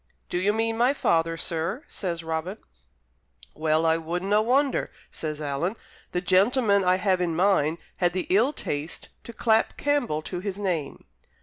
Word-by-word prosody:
"Do 175 - -1
you 195 +3 +2
mean 225 +1 -1
my 250 +4 +4
father, 165 -7 +1
sir?" 165 - -2
says 170 -4 -4
Robin. 165 +5 -3 1.0
"Well, 155 +1 +1
I 160 0 +4
wouldnae 180 +5 0
wonder," 265 +4 +2 0.2
says 155 -2 -4
Alan. 150 +7 -2 0.4
"The 180 - -1
gentleman 200 +2 +3
I 180 0 +4
have 185 -1 +1
in 170 -2 0
my 175 - +2
mind 165 -5 +3 0.2
had 175 -1 +1
the 185 - -1
ill 225 +9 +4
taste 150 - -5 0.2
to - - -7
clap 220 0 +1
Campbell 250 - 0
to 180 +2 -4
his 195 +1 -4
name." 180 -8 -3
185 Hz, 165 wpm, -26 LUFS, 165-220 Hz, 1.0 s, my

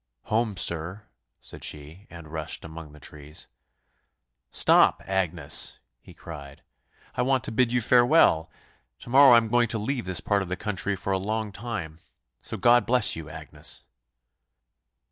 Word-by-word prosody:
"Home, 110 -2 -1
sir," 85 +5 -1 0.4
said - - -11
she, 75 +6 -6
and 85 -2 -11
rushed 80 -1 -4
among 80 -1 -9
the 75 - -15
trees. 75 +3 -8 1.0
"Stop, - - +4
Agnes," 90 -6 0 0.2
he - - -16
cried; 75 -2 -10 0.5
"I - - -1
want 130 0 +1
to 135 - -3
bid 120 +1 +2
you 125 0 +1
farewell; 120 - +4 0.5
to 120 - -10
morrow 135 -1 +8
I - - +8
am 115 -1 +2
going 120 +1 +2
to 115 - -2
leave 120 +4 -2
this 90 -2 0
part 100 -1 0
of 95 - -4
the 90 - -2
country 100 0 -2
for 95 +1 -3
a 95 - 0
long 110 +2 -3
time; 100 -7 -6 0.4
so - - -6
God 120 0 +4
bless 125 +1 +3
you, 80 -2 -8
Agnes." - - -7
100 Hz, 160 wpm, -26 LUFS, 80-120 Hz, 1.0 s, morrow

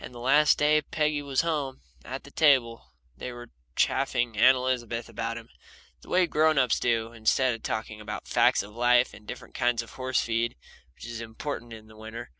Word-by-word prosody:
The 120 -1 -11
last 145 +5 +4
day 150 +1 +3
Peggy 150 0 -1
was 140 -2 0
home, 150 -5 -2 0.2
at - - -6
the - - -14
table, 115 - +2 0.2
they 125 - -6
were 120 -1 -10 0.2
chaffing 120 -2 +1
Aunt 130 +5 +6
Elizabeth 120 -2 -2
about 115 0 -4
him, 115 0 -11 0.5
the - - -16
way 180 0 +4
grown 155 -1 +2
ups 125 -3 +3
do, 115 -1 0
instead 120 +3 +2
of 115 - -7
talking 110 -1 -4
about 105 0 -6
the - - -13
facts - - +4
of 105 +1 -12
life 120 +1 +3
and 105 - -15
different - - -9
kinds 120 -1 +1
of - - -14
horse 130 0 -1
feed, 115 0 -1 0.4
which - - -11
is 115 -1 -6
important 120 +2 -6
in 110 -1 -10
the 110 0 -17
winter. 110 +2 -8
120 Hz, 200 wpm, -27 LUFS, 115-135 Hz, 0.5 s, Aunt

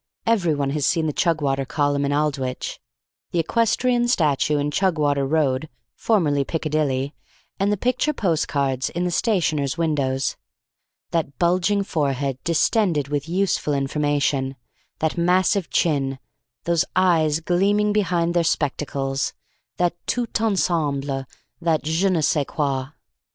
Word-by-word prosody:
Everyone 165 -11 +1
has 145 -1 0
seen 165 -2 +1
the 150 - -1
Chugwater 145 -5 +1
Column 145 -1 0
in 140 - 0
Aldwych, 140 -3 -2 0.5
the - - -3
equestrian 235 +6 +2
statue 150 - +2
in 145 0 -1
Chugwater 145 -6 +1
Road 150 -2 +1 0.2
(formerly 150 -11 +1
Piccadilly), 150 -3 -1 0.5
and 200 +1 +2
the 205 - +1
picture 250 +7 +1
postcards 145 - 0
in 175 - -3
the 180 - 0
stationers' 160 - 0
windows. 140 -5 0 0.7
That 155 -5 -2
bulging 185 +3 +2
forehead, 140 -7 -1
distended 170 - +1
with 145 +1 -2
useful 180 -5 0
information; 140 -1 0 0.4
that 160 +2 -1
massive 185 +2 +2
chin; 135 -5 +1 0.5
those 170 -1 +2
eyes, 165 -4 +3
gleaming 200 +5 +2
behind 175 -4 +1
their 175 -1 +2
spectacles; 140 -3 -1 0.4
that 175 -1 +2
tout 235 -2 -1
ensemble; 145 -10 0 0.4
that 165 -2 +1
je 160 +6 +1
ne 175 -4 +1
sais 145 -1 +2
quoi. 140 -4 -1
155 Hz, 125 wpm, -22 LUFS, 140-180 Hz, 0.7 s, eyes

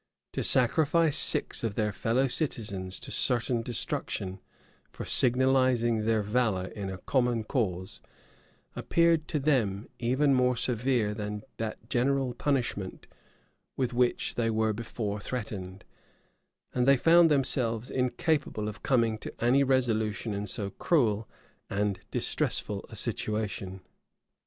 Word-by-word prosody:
To - - -2
sacrifice 155 +4 +3
six - - +2
of 110 -3 -2
their 105 -2 0
fellow 115 +7 +1
citizens 105 - -2
to - - -6
certain 120 -1 +2
destruction 100 -5 -3 0.5
for - - -7
signalizing 125 -3 +3
their 110 -1 +2
valor 105 -4 0
in 100 -3 -6
a 95 - -5
common 120 +2 0
cause, 95 -7 -2 0.7
appeared 170 -2 +2
to - - -1
them 120 -9 0
even 130 +4 +2
more 125 -1 +3
severe 120 -3 +1
than 105 0 -5
that 110 0 -5
general 130 +1 +1
punishment 120 -9 -2 0.7
with 130 -2 -1
which 125 0 +1
they 115 -1 0
were 110 0 +1
before 105 -1 -4
threatened; 105 -5 -6 0.9
and 125 0 +1
they 140 0 +6
found 165 +4 +6
themselves 125 -5 0
incapable 125 -2 -1
of 105 - -7
coming 115 -4 +1
to - - -7
any 125 +4 +3
resolution 115 -5 0
in 100 +1 -4
so 100 0 -3
cruel 110 - +1 0.4
and 100 -1 -1
distressful - - -1
a - - -10
situation. 100 -3 -3
115 Hz, 125 wpm, -28 LUFS, 105-130 Hz, 0.9 s, they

